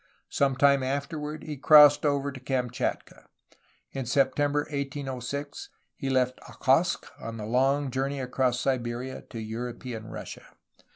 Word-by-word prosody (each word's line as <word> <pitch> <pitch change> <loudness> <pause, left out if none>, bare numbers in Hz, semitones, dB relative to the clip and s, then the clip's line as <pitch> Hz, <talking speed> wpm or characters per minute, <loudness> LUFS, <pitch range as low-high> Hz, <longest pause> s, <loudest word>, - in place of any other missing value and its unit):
Some 135 -1 +1
time 140 +1 +4
afterward 150 +3 -3
he 150 -2 -6
crossed 150 +1 +7
over 140 0 0
to 130 - -9
Kamchatka. 125 -2 -3 0.6
In 135 -3 -5
September 145 +3 +2
1806 140 -1 -5 0.3
he 135 - -4
left 130 -1 +1
Okhotsk 140 +7 +2
on 115 0 -6
the 105 - -5
long 135 +4 +1
journey 135 +2 -2
across 125 -1 0
Siberia 125 0 -2
to 115 - -7
European 115 0 -6
Russia. 110 - -9
135 Hz, 125 wpm, -27 LUFS, 125-140 Hz, 0.6 s, crossed